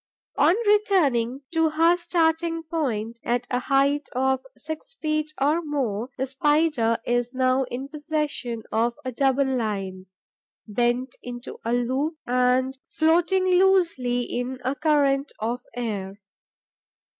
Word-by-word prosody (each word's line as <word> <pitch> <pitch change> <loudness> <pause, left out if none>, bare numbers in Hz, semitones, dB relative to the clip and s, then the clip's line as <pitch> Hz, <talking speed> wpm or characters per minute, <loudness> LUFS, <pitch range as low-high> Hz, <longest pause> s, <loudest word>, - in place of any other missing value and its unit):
On 350 - +5
returning 300 - +2
to 325 -1 +3
her 330 +3 +4
starting 330 -1 0
point, 235 -9 -2
at 245 +1 0
a 250 - +1
height 280 +2 +1
of 265 0 +1
six 315 +10 -8
feet 310 -4 -1
or 300 +5 +2
more, 260 -7 -2
the 265 - 0
Spider 275 -4 +2
is 245 +1 0
now 260 +1 +2
in 255 +2 -5
possession 295 -6 -3
of 235 +2 +1
a 255 - -2
double 270 +2 +2
line, 200 -7 -3 0.6
bent 240 +4 0
into 245 +1 -8
a 230 - -1
loop 260 +6 0
and 250 +1 +1
floating 345 +4 +2
loosely 360 -10 +3
in 245 +2 -3
a 260 - +1
current 285 -2 +1
of 235 +3 -2
air. 205 -5 -4
265 Hz, 125 wpm, -25 LUFS, 245-315 Hz, 0.6 s, On